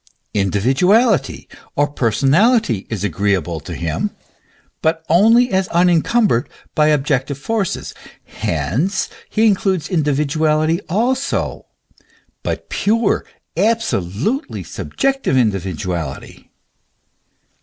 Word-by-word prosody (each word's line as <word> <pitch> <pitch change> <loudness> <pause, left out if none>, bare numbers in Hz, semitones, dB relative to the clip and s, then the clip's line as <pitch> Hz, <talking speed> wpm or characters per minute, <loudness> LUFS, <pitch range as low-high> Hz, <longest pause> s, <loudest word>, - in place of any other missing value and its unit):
Individuality 135 - +2 0.3
or 145 +1 +2
per 135 -5 0
sonality 140 - +2
is 105 -4 -3
agreeable 95 -3 0
to 80 +3 -8
him, 80 -1 -2 0.7
but 160 0 0
only 225 +8 +5
as 190 0 +1
unencumbered 175 - +2 0.2
by 150 0 +3
objective 140 -2 +1
forces; 200 +6 -2 0.3
hence, 155 - -2 0.2
he 220 - +2
includes 190 -6 +1
individuality 155 +1 +1
also, 250 +9 -1 0.7
but - - -4
pure, 220 +1 +1 0.3
absolutely 210 - -1
subjective 270 - -1
individuality. 90 - -3
155 Hz, 85 wpm, -18 LUFS, -, 0.7 s, only